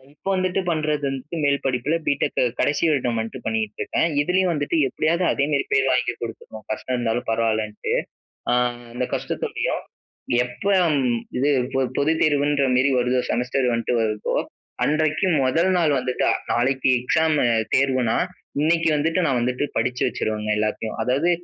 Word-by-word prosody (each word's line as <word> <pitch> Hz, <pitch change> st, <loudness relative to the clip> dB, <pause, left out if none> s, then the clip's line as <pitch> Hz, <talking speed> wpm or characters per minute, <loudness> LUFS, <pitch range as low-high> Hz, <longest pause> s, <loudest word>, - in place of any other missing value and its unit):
இப்போ 195 Hz, -, -6 dB
வந்துட்டு 185 Hz, 0 st, 0 dB
பண்றது 155 Hz, -2 st, 0 dB
வந்துட்டு, 135 Hz, +5 st, -5 dB
மேல் 140 Hz, 0 st, +3 dB
படிப்பில 135 Hz, +4 st, 0 dB
பிடெக் 140 Hz, -, 0 dB, 0.2 s
கடைசி 145 Hz, +3 st, +1 dB
வருடம் 125 Hz, -6 st, 0 dB
வந்துட்டு 110 Hz, 0 st, -5 dB
பண்ணிட்டு 110 Hz, -1 st, -2 dB
இருக்கேன். 165 Hz, -, +1 dB
இதுலயும் 180 Hz, +3 st, +2 dB
வந்துட்டு 145 Hz, 0 st, -1 dB
எப்படியாவது 165 Hz, +6 st, 0 dB
அதேமாரி 140 Hz, 0 st, 0 dB
பேர் 135 Hz, 0 st, +3 dB
வாங்கி 125 Hz, -1 st, +1 dB
குடுத்துறணும், 110 Hz, -1 st, -8 dB
கஷ்டம் 125 Hz, +3 st, -2 dB
இருந்தாலும் 120 Hz, 0 st, -1 dB
பரவாயில்லன்ட்டு. 110 Hz, -2 st, -1 dB, 0.6 s
அ 120 Hz, -, +3 dB, 0.4 s
அந்த 125 Hz, +1 st, -2 dB
கஷ்டத்தோடயும், -, -, -2 dB, 0.6 s
எப்போ 195 Hz, +11 st, -2 dB, 0.3 s
ம் 125 Hz, -3 st, +1 dB, 0.2 s
இது 140 Hz, +3 st, +2 dB, 0.2 s
பொ 135 Hz, -, +2 dB, 0.2 s
பொதுத் 155 Hz, +3 st, +1 dB
தேர்வுன்ற 145 Hz, -2 st, +2 dB
மாரி 130 Hz, +2 st, +3 dB
வருதோ, 125 Hz, +1 st, +1 dB
செமஸ்டர் 125 Hz, +1 st, 0 dB
வந்துட்டு 115 Hz, +1 st, -1 dB
வருதோ, 110 Hz, -1 st, -1 dB, 0.5 s
அன்றைக்கு 155 Hz, +4 st, +1 dB, 0.2 s
மொதல் 165 Hz, +8 st, +2 dB
நாள் 155 Hz, -5 st, +2 dB
வந்துட்டு 125 Hz, 0 st, -1 dB, 0.3 s
நாளைக்கு 130 Hz, +2 st, +2 dB
எக்ஸாம் 155 Hz, +4 st, +2 dB, 0.4 s
தேர்வுனா, 130 Hz, -4 st, +2 dB, 0.4 s
இன்னைக்கு 165 Hz, +1 st, +2 dB
வந்துட்டு 165 Hz, +4 st, +1 dB
நான் 130 Hz, -5 st, +1 dB
வந்துட்டு 125 Hz, +3 st, -1 dB
படிச்சு 125 Hz, 0 st, 0 dB
வச்சுருவேங்க 105 Hz, 0 st, -3 dB
எல்லாத்தையும். 110 Hz, +1 st, -2 dB
அதாவது 140 Hz, +8 st, +2 dB
135 Hz, 145 wpm, -23 LUFS, 120-155 Hz, 0.6 s, மேல்